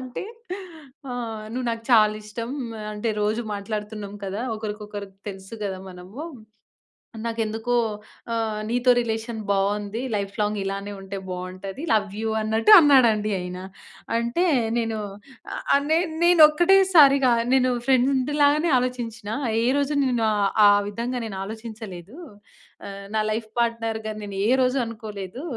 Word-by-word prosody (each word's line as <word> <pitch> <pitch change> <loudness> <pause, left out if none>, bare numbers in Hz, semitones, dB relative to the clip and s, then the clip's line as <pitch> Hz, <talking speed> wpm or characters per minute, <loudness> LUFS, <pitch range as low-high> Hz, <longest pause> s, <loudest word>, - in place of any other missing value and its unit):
అంటే, 255 +6 -6 0.9
ఆహ్, 225 -3 -5
నువ్వు 250 0 -3
నాకు 230 0 -4
చాలిష్టం. 215 +1 +2 0.3
ఆహ్, 210 - -6
అంటే 210 +2 -2
రోజు 215 +3 0
మాట్లాడుతున్నాం 210 0 -5
కదా! 200 +5 -3
ఒకరికొకరికి 210 -2 -7
తెలుసు 190 +2 -10
గదా, 190 -1 -4
మనము. 185 +10 -10 1.0
నాకెందుకో 225 +1 -1 0.6
ఆహ్, 220 -2 -1
నీతో 245 +1 +1
రిలేషన్ 225 0 -3
బావుంది. 205 +3 0
లైఫ్ 200 -1 -3
లాంగ్ 210 0 0
ఇలానే 195 +1 -4
ఉంటే, 195 +1 -6
బావుంటది 185 - -6
లవ్ 205 -2 +1
యూ 225 - -1
అన్నట్టు, 220 - +2
అన్నాడండి 235 -9 +4
ఆయన. 180 0 -6 0.6
అంటే, 235 +10 0 0.3
నేను 225 -2 -1 0.8
ఆహ్, 280 0 +3
నేన్ 325 0 +2
నేనొక్కటే 345 +2 +6 0.2
సారిగా, 275 -4 +7 0.2
నేను 255 -1 +3 0.2
ఫ్రెండు 265 +2 +2
లాగనే 300 +4 +4
ఆలోచించినా, 230 -4 -4 0.3
ఏ - - +1
రోజు 285 +1 0
నేను 240 -3 +1
ఆ - - +1 0.3
ఆ - - +8 0.2
విధంగా 240 +4 -3
నేను 195 -4 -6
ఆలోచించలేదు. 220 - -8 0.7
ఆహ్, 200 0 -8
నా 215 - +3
లైఫ్ 220 0 -3
పార్ట్‌నర్‌గా 225 -2 -2
నేనే 195 -1 -3 0.2
రోజు 255 +2 +1
అనుకోలేదు 215 0 -7
220 Hz, 125 wpm, -24 LUFS, 205-245 Hz, 1.0 s, ఆ